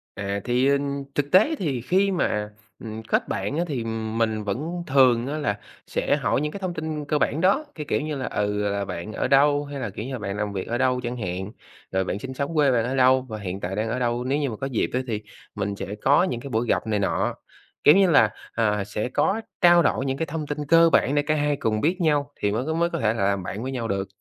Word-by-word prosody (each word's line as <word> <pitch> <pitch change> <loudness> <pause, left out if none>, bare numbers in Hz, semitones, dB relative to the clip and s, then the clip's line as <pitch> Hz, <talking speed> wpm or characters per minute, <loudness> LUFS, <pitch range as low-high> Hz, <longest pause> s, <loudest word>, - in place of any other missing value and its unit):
À, 100 0 -3
thì, 125 +2 +2
ừm, 140 0 0
thực 145 0 -1
tế 220 - +5
thì 140 - -2
khi 195 +8 +2
mà, 105 - 0 0.3
ừm, 110 -1 -7
kết - - 0
bạn 100 +10 -2
á, 170 - +2
thì 130 -6 -2 0.3
mình 110 -2 0
vẫn 155 - -3
thường 130 -2 +4
á 150 +2 -2
là 105 -9 -1 0.3
sẽ - - +1
hỏi - - 0
những 150 - -2
cái 200 - -7
thông 185 -2 -3
tin 155 -2 -4
cơ 150 +1 +1
bản 155 +3 0
đó, 235 +12 +3
cái 150 -2 -5
kiểu - - +1
như 150 0 -3
là, 130 - -3
ừ, 105 0 -1
là 100 0 -2
"bạn 95 +6 -6
ở - - -1
đâu?", 145 +2 +4
hay 140 -1 -6
là, 115 - -3
kiểu 110 +4 -6
như 135 - -5
là, 130 - -4
"bạn 100 -1 -4
làm 105 -1 -2
việc 95 - -4
ở 120 - -1
đâu?" 130 -1 +2
chẳng 120 +1 -3
hạn, 95 -1 -4 0.4
rồi 95 0 +1
"bạn 100 - -3
sinh 130 +3 -6
sống 140 +3 -2
ở - - -6
quê 145 -3 +4
bạn 115 -2 +2
ở 130 - -2
đâu 130 0 +5
và 110 -4 -7
hiện 95 -1 -5
tại 95 +1 -4
đang 110 +2 -1
ở 125 +2 -2
đâu?", 120 0 0
nếu 135 +3 0
như 140 -3 0
mà 110 - -5
có 135 - -3
dịp 125 -5 -1
á 125 - +1
thì 110 -3 -2 0.3
mình 100 0 -2
sẽ 100 +1 -5
có 140 +6 +5
những 125 -10 -1
cái 140 - -8
buổi 115 0 -1
gặp - - 0
này 105 -2 0
nọ. 100 - 0 0.5
Kiểu 150 - +8
như 195 -2 +5
là, 125 -9 +5 0.2
à, 105 -3 +1
sẽ 105 +4 -3
có 210 - +1 0.2
trao 175 -1 +7
đổi 135 - +1
những 135 0 -1
cái 165 - -1
thông 155 -1 -5
tin 150 0 -3
cơ 165 +1 +6
bản 140 -2 +3
để 145 - +4
cả 155 +1 0
hai 145 -1 +1
cùng 110 -4 -1
biết 180 +4 +1
nhau 145 -3 +1
thì 100 - -1
mới 115 +6 -1
có 160 - -1
mới 170 +1 +1
có - - -3
thể 110 -1 +2
là 110 - -1
làm 100 -2 0
bạn 105 +5 -5
với 130 - -3
nhau 120 -3 -3
được. 100 -1 -2
130 Hz, 275 wpm, -24 LUFS, 105-150 Hz, 0.5 s, Kiểu